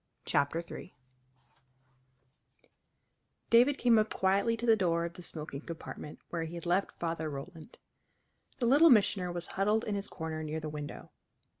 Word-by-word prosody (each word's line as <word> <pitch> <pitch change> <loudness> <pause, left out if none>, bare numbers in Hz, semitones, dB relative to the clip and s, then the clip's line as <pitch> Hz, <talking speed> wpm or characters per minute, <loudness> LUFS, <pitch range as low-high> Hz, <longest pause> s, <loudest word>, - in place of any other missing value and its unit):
CHAPTER 150 +4 +1
III 180 - -9 2.6
David 250 +5 +6
came 235 -3 +4
up 215 - 0
quietly 200 +5 +2
to 240 - -4
the 225 -2 +6
door 170 -4 +1
of 170 - -6
the 180 - -11
smoking 150 -4 -6
compartment 160 -2 -8
where 165 -1 -2
he 165 +2 -7
had 170 - -7
left 180 +3 0
Father 165 -2 -2
Roland. 155 - -9 0.8
The 245 - -1
Little 290 +7 +7
Missioner 200 -6 +4
was 175 0 -4
huddled 210 +3 +1
in 210 - -2
his 200 0 -2
corner 160 -1 -5
near 155 0 -3
the 155 -1 -5
window. 150 -1 -7
175 Hz, 155 wpm, -31 LUFS, 160-215 Hz, 2.6 s, Little